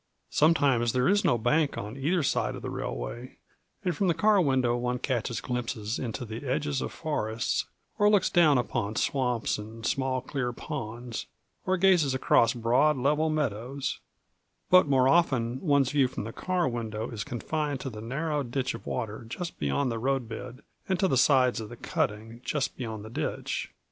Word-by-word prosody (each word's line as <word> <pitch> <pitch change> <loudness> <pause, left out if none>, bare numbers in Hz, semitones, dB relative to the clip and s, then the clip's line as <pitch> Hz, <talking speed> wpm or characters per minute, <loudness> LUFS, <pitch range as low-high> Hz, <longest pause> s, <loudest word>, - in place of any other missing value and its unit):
Sometimes 140 -7 +3
there 125 0 +2
is 205 +2 +3
no 120 - +3
bank 140 +6 +1
on 105 +3 -5
either 155 +5 +1
side - - 0
of - - -9
the - - -4
railway, - - -5 0.5
and 180 -3 +1
from 195 - +1
the 170 - +2
car 205 +3 +4
window 130 -6 +2
one 125 +1 -1
catches 120 -3 -2
glimpses 115 -3 -3
into 120 0 -4
the 110 +3 -7
edges 140 +1 -1
of - - -3
forests, 110 -7 -2 0.3
or 205 0 +6
looks 205 -3 +4
down 155 -6 +5
upon 110 -3 -1
swamps 125 -5 0
and 110 +1 -8
small 130 +1 0
clear 125 -1 -3
ponds, 120 -4 -5 0.4
or 185 0 +2
gazes 175 -8 +4
across 120 -2 +4
broad 125 +6 +3
level 150 +5 +2
meadows; 135 -2 -2 0.7
but 185 -4 +7
more 130 -2 +4
often 130 -6 +2
one's 140 -5 +3
view 140 -3 +3
from 125 - -5
the 115 +2 -6
car 180 -4 0
window 115 -2 -3
is 110 -3 -4
confined 145 +4 -2
to 130 - -4
the 105 -1 -8
narrow 145 +6 -2
ditch 130 0 -2
of - - -9
water 110 -2 -3
just 175 +6 -5
beyond 95 - 0
the 115 - -3
road 135 0 0
bed 120 +3 -8 0.3
and 190 -2 +1
to 190 - +3
the 155 - +1
sides 130 -2 +4
of 105 - -7
the 120 - -10
cutting 115 +3 -3
just 145 -2 -1
beyond 110 -4 -5
the - - -8
ditch. - - -3
130 Hz, 180 wpm, -28 LUFS, 115-150 Hz, 0.7 s, but